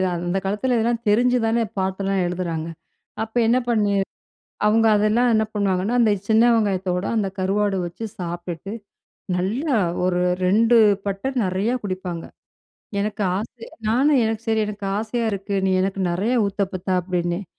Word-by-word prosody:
அந்த 175 Hz, +2 st, -2 dB
காலத்தில 210 Hz, +6 st, 0 dB
இதெல்லாம் 230 Hz, +1 st, 0 dB
தெரிஞ்சுதானே 235 Hz, 0 st, +2 dB
பாட்டெல்லாம் 190 Hz, 0 st, 0 dB
எழுதுறாங்க. 170 Hz, -3 st, -3 dB, 0.6 s
அப்ப 225 Hz, +2 st, -9 dB
என்ன 240 Hz, +2 st, +4 dB
பண்ணி 210 Hz, -3 st, +2 dB, 0.7 s
அவுங்க 225 Hz, +1 st, +4 dB
அதெல்லாம் 215 Hz, +4 st, +3 dB
என்ன 220 Hz, -, +3 dB
பண்ணுவாங்கன்னா, 200 Hz, +2 st, 0 dB
அந்த 225 Hz, -3 st, +4 dB, 0.2 s
சின்ன 220 Hz, +1 st, +5 dB
வெங்காயத்தோட, 190 Hz, -4 st, 0 dB
அந்த 205 Hz, -3 st, +1 dB
கருவாடு 195 Hz, +1 st, +1 dB
வச்சு 175 Hz, +6 st, -7 dB
சாப்ட்டுட்டு, 175 Hz, +2 st, -5 dB, 0.6 s
நல்லா 240 Hz, -, 0 dB, 0.3 s
ஒரு 180 Hz, -1 st, +1 dB, 0.2 s
2 225 Hz, +5 st, +4 dB, 0.3 s
பட்டை 200 Hz, +6 st, -2 dB
நெறையா 190 Hz, +6 st, 0 dB
குடிப்பாங்க. 185 Hz, -3 st, -4 dB, 0.8 s
எனக்கு 210 Hz, 0 st, -2 dB
ஆசை 230 Hz, +2 st, -7 dB, 0.2 s
நானும், 270 Hz, +5 st, +3 dB
"எனக்கு 225 Hz, 0 st, -2 dB
சரி, 220 Hz, -1 st, +2 dB
எனக்கு 205 Hz, -1 st, -6 dB
ஆசையா 225 Hz, +2 st, -2 dB
இருக்கு. 200 Hz, +1 st, -3 dB
நீ 190 Hz, -, +2 dB
எனக்கு 195 Hz, 0 st, -1 dB
நெறைய 200 Hz, +8 st, 0 dB
ஊத்தப்பத்தா." 195 Hz, -2 st, -2 dB
அப்படின்னேன். 175 Hz, +1 st, -2 dB
200 Hz, 135 wpm, -22 LUFS, 185-225 Hz, 0.8 s, சின்ன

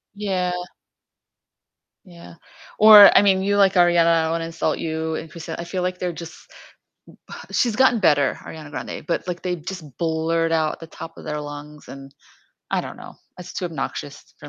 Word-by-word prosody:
Yeah. 185 Hz, -3 st, -2 dB, 1.5 s
Yeah, 170 Hz, -2 st, -14 dB, 0.4 s
or, 210 Hz, -1 st, +9 dB
I -, -, +7 dB
mean, 195 Hz, -2 st, +3 dB
you 200 Hz, +1 st, 0 dB
like 195 Hz, -1 st, +4 dB
Ariana, 175 Hz, -2 st, +4 dB
I 165 Hz, -1 st, +3 dB
don't 160 Hz, -, -1 dB
wanna 165 Hz, 0 st, -2 dB
insult 165 Hz, -1 st, -2 dB
you 160 Hz, 0 st, -3 dB
and 160 Hz, -, -7 dB
Christina, 165 Hz, 0 st, -8 dB
I -, -, -4 dB
feel, 180 Hz, +1 st, -4 dB
like, 180 Hz, 0 st, -3 dB
they're 180 Hz, -1 st, -3 dB
just 165 Hz, 0 st, -9 dB, 1.2 s
she's 235 Hz, -4 st, +1 dB
gotten 255 Hz, -3 st, +4 dB
better, 145 Hz, -6 st, +3 dB
Ariana 155 Hz, -2 st, -10 dB
Grande, 150 Hz, -, -7 dB
but, 170 Hz, -, -2 dB
like, 175 Hz, -1 st, -4 dB
they 180 Hz, -1 st, -2 dB
just 175 Hz, +1 st, -8 dB
blurt 165 Hz, 0 st, 0 dB
out 155 Hz, -1 st, 0 dB
the 165 Hz, -, -9 dB
top 165 Hz, 0 st, -10 dB
of -, -, -12 dB
their 150 Hz, 0 st, -4 dB
lungs 145 Hz, 0 st, -10 dB
and 135 Hz, 0 st, -11 dB, 0.6 s
I -, -, +1 dB
don't -, -, -8 dB
know, -, -, -12 dB, 0.2 s
it's 180 Hz, -, -9 dB
too -, -, -4 dB
obnoxious 145 Hz, -2 st, -7 dB
for 145 Hz, -, -11 dB
165 Hz, 180 wpm, -22 LUFS, 160-185 Hz, 1.5 s, or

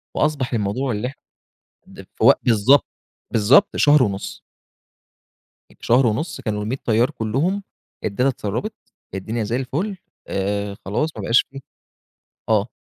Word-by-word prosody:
وأصبح 140 Hz, -5 st, 0 dB
الموضوع 115 Hz, +5 st, -1 dB
اللي 105 Hz, +3 st, -2 dB
إح 135 Hz, -, -7 dB, 0.7 s
ده -, -, -12 dB
في -, -, -2 dB
وق -, -, +7 dB
بالضبط، 120 Hz, +5 st, +4 dB, 0.4 s
بالضبط 115 Hz, -, +4 dB
شهر 145 Hz, -2 st, +5 dB
ونُص. 100 Hz, -3 st, -3 dB, 1.3 s
في -, -, -21 dB
شهر 125 Hz, +2 st, +4 dB
ونُص 145 Hz, +10 st, -2 dB
كانوا 105 Hz, -1 st, -2 dB
ال100 125 Hz, +6 st, -2 dB
طيار 115 Hz, +2 st, +3 dB
كلّهم، 150 Hz, -, -1 dB, 0.4 s
الداتا 125 Hz, +7 st, +1 dB
اتسرّبت، 120 Hz, -, -3 dB, 0.4 s
الدنيا 110 Hz, +4 st, -3 dB
زي 110 Hz, +3 st, -2 dB
الفل، 150 Hz, +11 st, -2 dB, 0.3 s
آآ، 100 Hz, +1 st, -2 dB
خلاص 150 Hz, +11 st, 0 dB
ما -, -, -4 dB
بقاش 115 Hz, -, +3 dB
فيه 135 Hz, -, -8 dB, 0.9 s
آه. 110 Hz, +1 st, +2 dB
120 Hz, 135 wpm, -21 LUFS, 105-135 Hz, 1.3 s, وق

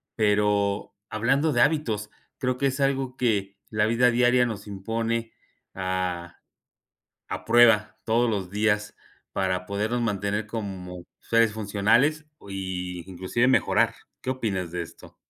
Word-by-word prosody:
Pero 105 Hz, -1 st, +1 dB, 0.2 s
hablando 135 Hz, +8 st, +1 dB
de 120 Hz, -, +3 dB
hábitos, 115 Hz, -10 st, +1 dB, 0.3 s
creo 125 Hz, -1 st, 0 dB
que 140 Hz, -, 0 dB
es 135 Hz, +1 st, -2 dB
algo 135 Hz, -2 st, 0 dB
que 100 Hz, -6 st, 0 dB
la 105 Hz, -1 st, +1 dB
vida 120 Hz, +2 st, +4 dB
diaria 125 Hz, +1 st, +4 dB
nos 110 Hz, -3 st, -5 dB
impone 115 Hz, +3 st, -2 dB, 0.4 s
a 90 Hz, -2 st, -3 dB, 0.9 s
a -, -, -5 dB
prueba 115 Hz, -2 st, +5 dB
todos 115 Hz, +1 st, +2 dB
los 95 Hz, -4 st, -2 dB
días 105 Hz, +1 st, 0 dB, 0.4 s
para 95 Hz, -1 st, -1 dB
podernos 105 Hz, +5 st, -1 dB
mantener 105 Hz, -1 st, -1 dB
como 95 Hz, -5 st, -6 dB, 0.2 s
seres 115 Hz, -1 st, +2 dB
funcionales 110 Hz, +9 st, +2 dB, 0.2 s
y 90 Hz, -2 st, -4 dB
inclusive 95 Hz, +7 st, 0 dB
mejorar, 130 Hz, -, +3 dB, 0.2 s
¿qué 130 Hz, -, -3 dB
opinas 100 Hz, -9 st, -2 dB
de 90 Hz, 0 st, -3 dB
esto? 85 Hz, -, -13 dB
105 Hz, 130 wpm, -26 LUFS, 95-120 Hz, 0.9 s, prueba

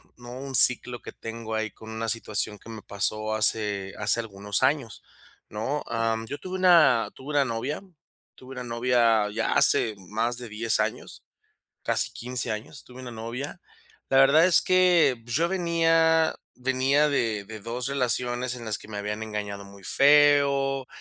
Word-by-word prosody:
¿no?, 120 Hz, -1 st, -12 dB
un 135 Hz, -1 st, -5 dB
ciclo 125 Hz, -1 st, +4 dB
que -, -, -9 dB
tengo 115 Hz, 0 st, -8 dB
ahí 110 Hz, 0 st, -2 dB
con 110 Hz, +3 st, -14 dB
una 110 Hz, +1 st, -5 dB
situación 110 Hz, -2 st, -2 dB
que -, -, -15 dB
me 110 Hz, -2 st, -9 dB
pasó 110 Hz, +2 st, -1 dB
hace 105 Hz, -3 st, +1 dB
hace 110 Hz, +2 st, +2 dB
algunos 100 Hz, -2 st, -3 dB
años 135 Hz, -8 st, -1 dB, 0.5 s
¿no?, 130 Hz, +8 st, -3 dB
am, 115 Hz, -1 st, -2 dB
yo 145 Hz, -, -5 dB
tuve 185 Hz, 0 st, -7 dB
una 165 Hz, -10 st, +4 dB
tuve 135 Hz, +3 st, -9 dB
una 145 Hz, -1 st, +3 dB
novia 125 Hz, +5 st, -4 dB, 0.5 s
tuve 130 Hz, +1 st, -14 dB
una 125 Hz, -, -7 dB
novia 115 Hz, -3 st, +1 dB
ya 110 Hz, +1 st, -1 dB
hace 110 Hz, -2 st, +4 dB
más 110 Hz, +5 st, -3 dB
de 120 Hz, -1 st, -7 dB
10 110 Hz, +1 st, -1 dB
años, -, -, -4 dB, 0.6 s
casi -, -, +3 dB
15 125 Hz, 0 st, -3 dB
años 130 Hz, +7 st, -8 dB
tuve 125 Hz, 0 st, -13 dB
una 125 Hz, -, -8 dB
novia. 120 Hz, -, -7 dB, 0.5 s
La 135 Hz, -, +4 dB
verdad 140 Hz, +5 st, +6 dB
es 185 Hz, -, +7 dB
que, 175 Hz, -9 st, +3 dB
yo 135 Hz, +9 st, 0 dB
venía 165 Hz, -2 st, +2 dB, 0.2 s
venía 130 Hz, +3 st, +1 dB
de 115 Hz, -7 st, -1 dB
de 110 Hz, +1 st, -9 dB
2 120 Hz, +4 st, -4 dB
relaciones 125 Hz, -2 st, -1 dB
en 120 Hz, -2 st, -9 dB
las 110 Hz, -2 st, -3 dB
que -, -, -14 dB
me 105 Hz, -1 st, -7 dB
habían 105 Hz, +1 st, -4 dB
engañado 105 Hz, -2 st, -6 dB
muy 100 Hz, 0 st, -15 dB
feo, 140 Hz, 0 st, +3 dB
120 Hz, 165 wpm, -25 LUFS, 110-140 Hz, 0.6 s, es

